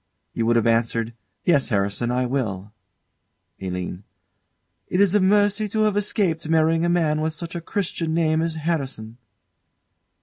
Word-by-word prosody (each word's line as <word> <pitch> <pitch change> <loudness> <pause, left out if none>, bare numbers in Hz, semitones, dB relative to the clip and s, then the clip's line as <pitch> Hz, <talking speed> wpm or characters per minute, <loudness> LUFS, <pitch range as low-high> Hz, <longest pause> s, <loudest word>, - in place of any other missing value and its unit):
You 115 -1 -1
would 120 - +3
have 115 - +2
answered, 115 0 +1 0.3
"Yes, 145 -6 +3
Harrison, 100 +2 0
I 125 +1 +1
will." 110 -6 -3 0.9
ALINE. 90 0 -4 0.8
It 180 - -1
is 200 -2 +4
a 210 - +4
mercy 205 +2 +3
to 215 +2 +1
have 210 -2 +2
escaped 190 -6 0
marrying 160 0 +3
a 170 - +2
man 160 -3 +1
with 160 0 -1
such 165 +1 -7
a 170 - -4
Christian 170 -2 -2
name 160 -1 +2
as 165 -1 -1
Harrison. 135 -8 -3
160 Hz, 155 wpm, -23 LUFS, 115-175 Hz, 0.9 s, is